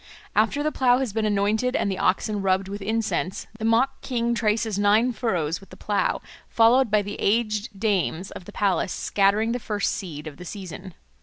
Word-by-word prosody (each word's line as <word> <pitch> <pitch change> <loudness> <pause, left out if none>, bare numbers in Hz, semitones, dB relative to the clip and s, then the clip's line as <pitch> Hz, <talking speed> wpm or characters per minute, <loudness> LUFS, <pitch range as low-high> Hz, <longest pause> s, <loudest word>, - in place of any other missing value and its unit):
After 225 +8 +2
the 305 - 0
plough 250 -3 +3
has 255 -6 -2
been 220 -1 0
anointed 215 +5 +1
and 200 - +1
the 190 - -3
oxen 205 +2 +1
rubbed 190 0 +1
with 200 +1 -6
incense, 210 -3 -1
the 220 - -3
mock 240 +4 +2
king 235 -2 -1
traces 220 -2 0
nine 215 +5 +4
furrows 175 -10 -1
with 195 - -17
the - - -13
plough, 205 -1 0 0.3
followed 235 +2 +4
by 210 0 +3 0.2
aged 215 -2 0
dames 195 -4 0
of 175 - -9
the 205 - -10
palace 190 -3 0
scattering 205 +3 +1
the 245 - -1
first 210 -3 -1
seed 155 -5 -6
of 150 -2 -8
the 180 - -9
season. 185 -1 -8
210 Hz, 185 wpm, -24 LUFS, 195-230 Hz, 0.3 s, nine